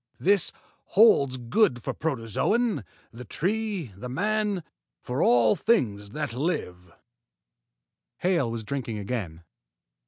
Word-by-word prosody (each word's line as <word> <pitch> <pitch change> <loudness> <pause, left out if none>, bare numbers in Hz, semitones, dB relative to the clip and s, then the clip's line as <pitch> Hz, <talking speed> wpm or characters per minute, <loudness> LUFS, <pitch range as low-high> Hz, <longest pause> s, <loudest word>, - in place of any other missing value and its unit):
This 200 +1 +3 0.3
holds 140 - +5
good 125 - +1
for - - -2
the - - -25
protozoan, 155 - 0 0.3
the 120 +2 -9
tree, 190 - -2
the 125 +6 -7
man 205 +4 0 0.4
for 125 +1 -3
all 120 -3 +5
things 105 - +1
that 145 +1 -4
live." 90 - -3 1.3
Hale 175 -9 +1
was 115 -1 -4
drinking 120 -2 -4
again. 100 -6 -4
130 Hz, 115 wpm, -26 LUFS, -, 1.3 s, holds